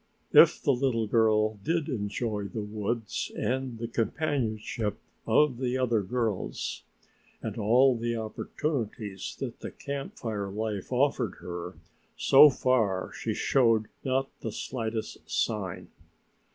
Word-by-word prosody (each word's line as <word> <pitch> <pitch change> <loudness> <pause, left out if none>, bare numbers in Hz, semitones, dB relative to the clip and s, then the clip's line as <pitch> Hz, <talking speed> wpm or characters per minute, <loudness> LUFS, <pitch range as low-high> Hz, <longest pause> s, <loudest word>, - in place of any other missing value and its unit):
If - - +8
the 140 - +2
little 120 -3 +1
girl 110 -1 +3
did 165 -1 0
enjoy 105 -4 -2
the 105 +2 -4
woods 105 +1 -3
and 130 -2 -1
the 115 +1 -4
companionship 115 -4 -1 0.3
of 125 +2 +3
the 130 -1 0
other 120 -4 +2
girls 110 -1 -2 0.6
and - - -3
all 125 +5 +4
the 115 0 -2
opportunities 110 - -4
that - - -5
the - - -6
camp 140 -1 -6
fire 105 -4 -3
life 105 +1 -4
offered 125 -5 +1
her, 90 0 -6 0.4
so 145 +2 +8
far 115 -8 +1
she - - -3
showed 115 -5 +3
not 135 +1 0
the 115 - -4
slightest 110 -1 -4
sign. 100 -5 -2
115 Hz, 125 wpm, -28 LUFS, 105-130 Hz, 0.6 s, If